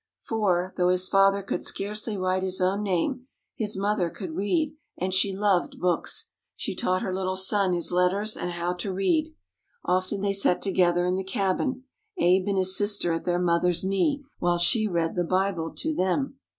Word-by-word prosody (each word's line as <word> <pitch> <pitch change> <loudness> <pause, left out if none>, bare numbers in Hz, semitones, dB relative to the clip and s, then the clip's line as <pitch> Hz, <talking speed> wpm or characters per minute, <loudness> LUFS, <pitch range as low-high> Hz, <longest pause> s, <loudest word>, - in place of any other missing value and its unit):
For, 185 -5 -1
though 180 -1 +3
his 185 0 +1
father 195 0 +3
could - - -3
scarcely 210 +1 -3
write 185 0 0
his 190 0 +3
own 190 +2 +1
name, 210 - -1 0.3
his 210 -3 -2
mother 200 -3 0
could 185 -1 -7
read, 290 - 0 0.2
and 185 +1 -2
she 195 +1 +3
loved 195 -2 0
books. 180 -2 0 0.3
She - - -4
taught 185 0 -1
her 185 - -2
little 185 0 -2
son 190 0 +3
his 175 0 0
letters 185 +4 +1
and 175 - -4
how 175 +1 -2
to 190 +2 -4
read. 310 - 0 0.5
Often 185 +2 0
they 200 0 0
sat 195 -2 +1
together 175 -2 +2
in 180 +1 0
the 190 - -2
cabin, 200 +7 -1 0.3
Abe 185 +2 +3
and 200 -1 0
his 190 0 +3
sister 205 -4 0
at 165 - -4
their 175 -1 +1
mother's 175 0 +1
knee, 275 +10 0 0.2
while 175 0 +1
she 215 +5 +3
read 170 -4 -1
the 175 - 0
Bible 185 -2 -1
to 315 - -2
them. 270 +5 -1
190 Hz, 185 wpm, -26 LUFS, 180-205 Hz, 0.5 s, though